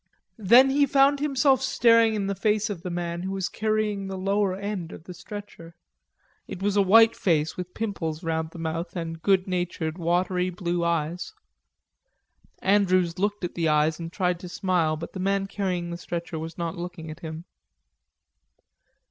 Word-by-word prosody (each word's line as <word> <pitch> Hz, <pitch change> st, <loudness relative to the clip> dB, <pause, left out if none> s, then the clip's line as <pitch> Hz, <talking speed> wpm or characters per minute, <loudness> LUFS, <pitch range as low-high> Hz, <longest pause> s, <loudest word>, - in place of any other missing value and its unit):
Then 245 Hz, +6 st, +6 dB
he 285 Hz, +1 st, +3 dB
found 275 Hz, +1 st, +4 dB
himself 275 Hz, -2 st, +2 dB
staring 230 Hz, -4 st, +4 dB
in 205 Hz, -2 st, -1 dB
the 200 Hz, -, -1 dB
face 210 Hz, +1 st, 0 dB
of 180 Hz, -5 st, -6 dB
the 180 Hz, -, -5 dB
man 170 Hz, 0 st, -3 dB
who 190 Hz, -, -4 dB
was 190 Hz, -2 st, -1 dB
carrying 215 Hz, -2 st, -1 dB
the 190 Hz, 0 st, -5 dB
lower 195 Hz, 0 st, 0 dB
end 200 Hz, -4 st, -4 dB
of -, -, -10 dB
the 180 Hz, -, -9 dB
stretcher. 190 Hz, -4 st, -10 dB, 0.7 s
It -, -, -7 dB
was 200 Hz, +1 st, 0 dB
a 205 Hz, -, +5 dB
white 225 Hz, +4 st, +6 dB
face 160 Hz, -4 st, +1 dB
with 180 Hz, 0 st, -7 dB
pimples 185 Hz, -7 st, -3 dB
round 160 Hz, -1 st, -1 dB
the 170 Hz, -, -12 dB
mouth 165 Hz, +2 st, -4 dB
and 165 Hz, -2 st, -5 dB
good 190 Hz, 0 st, +2 dB
natured, 175 Hz, -2 st, -2 dB
watery 180 Hz, +2 st, +1 dB
blue 175 Hz, -1 st, -2 dB
eyes. 170 Hz, +1 st, -1 dB, 1.3 s
Andrews 185 Hz, -3 st, +2 dB
looked 205 Hz, 0 st, -1 dB
at 175 Hz, -, -3 dB
the 165 Hz, -2 st, 0 dB
eyes 155 Hz, +1 st, +2 dB
and 165 Hz, 0 st, -6 dB
tried 180 Hz, -2 st, 0 dB
to 180 Hz, -, -8 dB
smile, 170 Hz, -3 st, 0 dB
but 165 Hz, +2 st, -8 dB
the 190 Hz, -, -6 dB
man 195 Hz, +1 st, 0 dB
carrying 185 Hz, -3 st, -3 dB
the 170 Hz, -, -4 dB
stretcher 170 Hz, -1 st, -5 dB
was 160 Hz, +1 st, -7 dB
not 170 Hz, -2 st, -3 dB
looking 170 Hz, -2 st, -6 dB
at 155 Hz, -, -10 dB
him. 160 Hz, -1 st, -7 dB
180 Hz, 175 wpm, -26 LUFS, 170-205 Hz, 1.3 s, Then